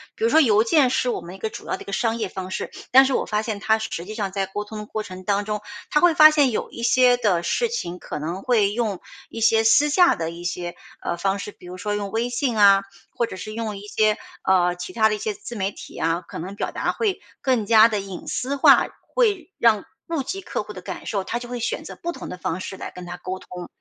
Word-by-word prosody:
比 445 - -6
如 460 - +4
说 320 - +6
邮 220 -7 +5
件 260 +3 +4
是 250 - +1
我 - - -1
们 175 +2 -9
一 - - -10
个 220 - -2
主 - - -10
要 - - -1
的 - - -12
一 - - -22
个 200 - -7
商 230 +1 0
业 215 -4 -2
方 185 0 -6
式， - - -4 0.2
但 265 +2 +9
是 265 - 0
我 - - 0
发 210 0 0
现 220 -2 -4
他 220 +1 +2
实 220 - -4
实 170 - -4
际 215 - -7
上 200 -4 -2
在 195 0 -1
沟 205 +2 -4
通 215 +1 -9
的 210 - -6
过 215 - -4
程 185 -1 -9
当 200 +1 +1
中， 210 0 -3 0.3
他 300 - +3
会 350 0 +5
发 310 0 +9
现 290 -4 +3
有 220 - -2
一 235 - -7
些 250 0 +5
的 200 -8 +2
事 475 - +1
情 180 - -4
可 - - -6
能 170 +5 -4
会 215 -5 +3
用 215 -4 -2 0.3
一 225 - -7
些 225 0 +4
私 290 +7 +5
下 350 +4 +5
的 165 -1 -3
一 170 +1 -9
些， 175 0 -3 0.3
呃， 170 - -2
方 195 +2 0
式， 210 - -6
比 180 - -18
如 180 +1 -8
说 205 +2 -2
用 200 -1 -4
微 230 +2 -1
信 245 -1 -1
啊， 200 -1 +6 0.3
或 235 - -1
者 205 - -8
是 215 +3 -7
用 220 -2 -3
一 195 - -9
些， 215 0 +2 0.3
呃， 180 -2 +3
其 180 +1 -7
它 220 -1 +4
的 210 - 0
一 - - -5
些 215 0 -3
自 225 +4 -9
媒 195 -1 -1
体 - - -11
啊， 165 +2 0
可 - - -10
能 190 +5 -6
表 - - -3
达 - - -1
会 420 -4 -1 0.2
更 255 -5 +1
加 220 +1 +7
地 210 -3 -1
隐 195 -2 -8
私 270 +3 -2
化， 275 - +6 0.3
会 410 -8 +1
让 220 -4 +4 0.2
顾 330 -4 -1
及 385 +9 -5
客 - - -3
户 - - -9
的 - - -9
感 - - -7
受。 200 -4 -1
他 235 +5 -3
就 240 0 -9
会 245 -1 -4
选 465 - -2
择 - - -9
不 345 - -4
同 - - -8
的 180 - -6
方 180 +1 -3
式 190 - -6
来 - - -7
跟 180 - -10
他 180 0 -6
沟 185 +1 -5
通， 180 -1 -9
215 Hz, 300 characters per minute, -23 LUFS, 190-245 Hz, 0.3 s, 但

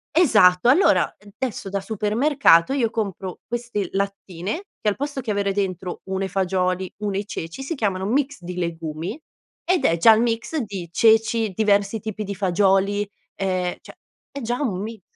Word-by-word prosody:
Esatto, 215 - +5
allora 335 +10 +4 0.3
adesso 235 -6 -3
da 200 0 -2
supermercato 220 - +3
io 250 -5 +1
compro 195 -5 -4
queste 235 -5 -3
lattine 195 - -3
che 210 - +1
al 205 - -1
posto 285 0 -4
che 230 - -3
avere 200 -1 0
dentro 185 -2 -3
uno 190 0 -2
i - - -3
fagioli 185 -1 -1
uno 205 -2 -2
i 200 - -2
ceci, 170 +5 -6
si 285 - -3
chiamano 195 -7 -1
mix 275 +6 0
di 175 +1 -7
legumi, 165 - -4 0.4
ed 360 0 +1
è 165 - +3
già 225 +7 +7
il 220 - +2
mix 235 +6 -1
di 200 - -4
ceci, 225 +2 +3
diversi 205 +1 +1
tipi 215 0 -5
di 200 0 -5
fagioli, 195 +2 +2 0.3
ehm, 185 -2 -1
cioè - - -13 0.4
è 280 - -6
già 240 +1 -2
un 200 -10 -1
mix 220 0 -6
205 Hz, 170 wpm, -23 LUFS, 185-230 Hz, 0.4 s, già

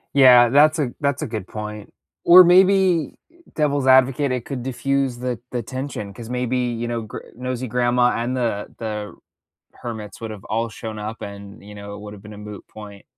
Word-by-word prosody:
Yeah, 125 -3 +8
that's 155 +5 +4
a 130 -5 0
that's 140 +1 0
a - - -3
good 110 -4 -5
point, 105 0 -8 0.3
or 180 +1 +9
maybe, 185 -3 +4
er, 340 - -28 0.2
devil's 145 -3 0
advocate, 130 +1 +4
it 125 -2 -3
could 130 -4 -5
diffuse 135 0 -1
the 125 -1 -3
the 120 -1 -2
tension 130 -5 -6
'cause 115 +2 -10
maybe, 125 0 -1
you 120 -1 -2
know, 120 -1 -2
gr 110 - -8 0.2
nosy 125 0 -4
grandma 125 +1 +2
and 120 +3 -2
the 115 -4 -2
the 105 -2 -5 0.6
hermits 110 -2 -8
would 110 -1 -5
have 105 -3 -10
all 115 +1 -2
shown 110 0 -7
up 110 +2 -6
and, 100 0 -9
you 105 +1 -12
know, 100 0 -8
it - - -10
would 105 0 -9
have 100 0 -13
been 105 - -11
a - - -11
moot 105 -1 -9
point. 105 -2 -12
120 Hz, 200 wpm, -21 LUFS, 105-130 Hz, 0.6 s, or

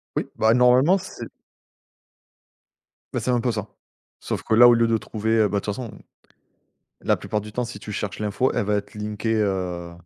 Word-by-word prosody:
Oui, - - -2
bah 110 +1 +3
normalement 125 +9 +5
c'est 185 - -8 1.9
bah, - - 0
c'est - - -4
un 120 - +2
peu 120 - 0
ça. 105 -2 -4 0.5
Sauf - - -4
que 110 - +1
là, 120 +1 +9
au 120 - +7
lieu 115 0 +3
de 115 - +2
trouver, 110 +1 -1
heu, 105 - +4
bah 100 +1 -1
de - - -10
toute 105 - -1
façon 120 -4 -6 1.1
la - - +2
plupart 105 - -3
du 105 +1 -10
temps 125 +3 -2
si 110 -3 -8
tu 105 - -8
cherches 105 0 -4
l'info, 105 +5 0
elle - - 0
va 105 +1 +1
être 100 0 -4
linkée, 105 +1 -3
heu, 90 -5 -1
110 Hz, 205 wpm, -23 LUFS, 105-120 Hz, 1.9 s, là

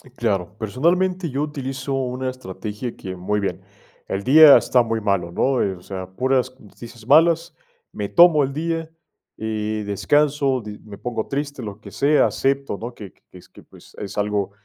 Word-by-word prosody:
Claro, 100 -6 -1
personalmente 170 - 0
yo 135 +2 -2
utilizo 135 -2 -4
una 130 0 -2
estrategia 105 0 -6
que, 95 -1 -7
muy 105 +4 -1
bien, 100 - -3 0.5
el 95 +1 -3
día 150 +2 +9
está 125 - +3
muy 115 -1 -2
malo, 100 -5 0
¿no?, 130 +7 +1
eh, 95 - 0
o 90 - -15
sea, 95 0 -7
puras 130 +4 0
noticias 115 +2 -13
malas, 165 +3 +4 0.4
me - - -4
tomo 170 -4 +6
el 135 - -3
día 165 +1 -3 0.5
y 110 -1 -3
descanso, 135 +5 +1
di 105 -1 -9
me 105 -2 -12
pongo 115 -1 -4
triste, 140 -1 -4
lo 105 -1 -8
que - - -11
sea, 145 +2 +3
acepto, 135 -4 -1
¿no?, 120 +3 -7
que 100 -5 -10
que - - -37
es - - -17
que, - - -16
pues, - - -18
es 100 0 -7
algo 105 -1 -1
125 Hz, 175 wpm, -22 LUFS, 105-140 Hz, 0.5 s, día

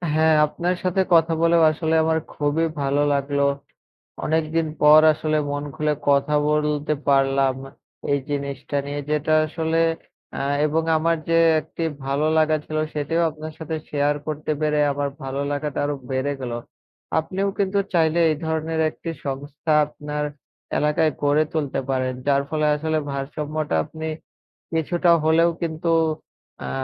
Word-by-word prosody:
হ্যাঁ, 160 0 +4
আপনার 175 +4 -2
সাথে 185 +1 +1
কথা 165 0 +4
বলেও 170 0 +4
আসলে 160 +1 -1
আমার 160 0 +2
খুবই 150 +3 0 0.2
ভালো 140 +1 +1
লাগলো। 140 0 0 0.8
অনেকদিন 160 +1 0
পর 150 +1 +8
আসলে 155 0 -1
মন 145 0 -3
খুলে 150 -1 0 0.2
কথা 140 +1 +3
বলতে 150 0 0 0.2
পারলাম 135 -1 +3 0.6
এই 140 - +2
জিনিসটা 140 0 -3
নিয়ে 145 +1 -4
যেটা 150 +1 +1
আসলে 160 +1 -1 0.5
অ্যা - - -3 0.2
এবং 160 +2 +1
আমার 165 +1 +2
যে 165 - +4 0.2
একটি 165 - -6 0.2
ভালো 140 +3 0
লাগা 155 0 +3
ছিল 155 - -4 0.2
সেটিও 155 +3 0
আপনার 155 0 -8
সাথে 160 0 -4
শেয়ার 145 0 +1
করতে 155 0 -3
পেরে 150 -1 +1
আমার 140 0 -2
ভালো 135 +1 -3
লাগাটা 145 0 -3
আরো 145 0 -1 0.2
বেড়ে 130 +2 0
গেল। 125 -2 -4 0.7
আপনিও 190 +5 -2
কিন্তু 200 0 +1
চাইলে 165 -1 +3
এই - - 0
ধরনের 160 0 -2
একটি 165 - -8 0.2
সংস্থা 145 +3 -4
আপনার 150 0 -5 0.5
এলাকায় 150 +1 +2
গড়ে 145 +1 +3
তুলতে 150 -4 -1
পারেন। 130 -1 0
যার 140 -1 +3
ফলে 155 -1 0
আসলে 155 +1 -1
ভারসাম্যটা 150 - -3
আপনি 160 0 -7 0.7
কিছুটা 170 +2 +1
হলেও 165 +2 +4
কিন্তু 165 0 -2 0.7
অ্যা 65 - -5
155 Hz, 145 wpm, -23 LUFS, 145-160 Hz, 0.8 s, পর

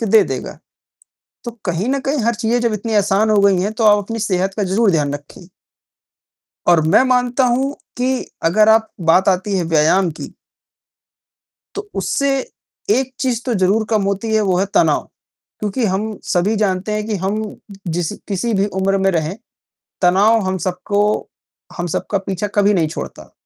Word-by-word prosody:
के 225 - -1
दे 215 +1 +6
देगा। - - -5 0.9
तो 240 - -4
कहीं 180 +5 -1
न 275 +1 0
कहीं 275 +2 -1
हर 235 0 +2
चीज़ें 235 +1 0
जब 235 -2 0
इतनी 215 +2 -3
आसान 205 +1 +2
हो 210 -1 +4
गई 195 -3 +4
हैं 205 +3 -1
तो 220 0 -2
आप 210 -1 +6
अपनी 230 +2 -5
सेहत 190 +1 0
का 210 - -1
ज़रूर 200 +3 +2
ध्यान 145 -4 0
रखें। 145 +4 -11 1.2
और 170 -2 +6
मैं 215 +8 +5
मानता 250 0 +2
हूँ 265 +3 +1 0.2
कि 255 +1 0 0.3
अगर 215 +6 +4
आप 220 0 +4 0.2
बात 190 +3 +4
आती 195 +2 +1
है 175 - -1
व्यायाम 165 +3 +2
की। - - -7 1.4
तो 410 0 -6
उससे 280 0 0 0.6
एक 260 -6 +1
चीज 245 -3 -1
तो 245 -3 -1
ज़रूर 200 +3 +2
कम 215 -2 +2
होती 200 +3 -1
है 215 - +3
वो 185 -3 +1
है 195 - +1
तनाव, - - +3 0.6
क्योंकि 215 +3 -1
हम 210 +2 -2
सभी 200 +5 +1
जानते 195 0 -1
हैं 210 0 -2
कि 215 -2 -2
हम 215 +2 -1 0.6
जिस 175 +3 -2 0.2
किसी 205 +4 -1
भी 195 +1 +2
उम्र 195 +1 +1
में 195 0 +2
रहें, 165 +1 -2 0.7
तनाव 205 +6 +4
हम 185 0 -1
सबको 200 +3 -1 0.8
हम 175 - -2
सबका 185 +4 -2
पीछा 195 +1 -3
कभी 205 0 +4
नहीं 160 -4 +1
छोड़ता। - - -8
205 Hz, 175 wpm, -18 LUFS, 185-225 Hz, 1.4 s, दे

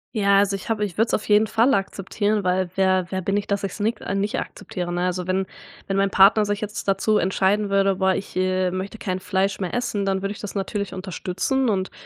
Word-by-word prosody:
Ja, 200 -2 +4
also, 200 0 +2
ich 195 - -8
habe 210 -2 0
ich 185 -2 -8
würde's 225 +1 +1
auf 215 - -1
jeden 210 +1 +4
Fall 230 +5 +3
akzeptieren, 200 +1 -1
weil 180 0 +1
wer 185 -2 +2
wer 190 0 -2
bin 195 +3 -1
ich, 205 - 0
dass 200 0 -2
ich's 195 +2 -6
nick 225 +3 0 0.2
nicht 200 +1 -1
akzeptiere, 175 -2 -5
ne, 175 - -1
also, 180 0 -2
wenn 190 +1 0 0.4
wenn 195 0 -1
mein 195 0 +2
Partner 200 +2 +5
sich 205 +1 -2
jetzt 210 0 -5
dazu 210 +2 +2
entscheiden 195 +2 +1
würde: 195 0 +2
„Boah 190 0 +2
ich, 195 - -6
äh, 185 0 +1
möchte 190 +4 -5
kein 185 -2 -2
Fleisch 190 +1 -1
mehr 185 -3 -3
essen“, 235 -5 -1
dann 190 -1 0
würde 195 +1 -2
ich 205 - -8
das 205 0 -7
natürlich 200 0 -3
unterstützen 190 +7 -2
und, 190 -3 -1
195 Hz, 230 wpm, -23 LUFS, 185-210 Hz, 0.4 s, Partner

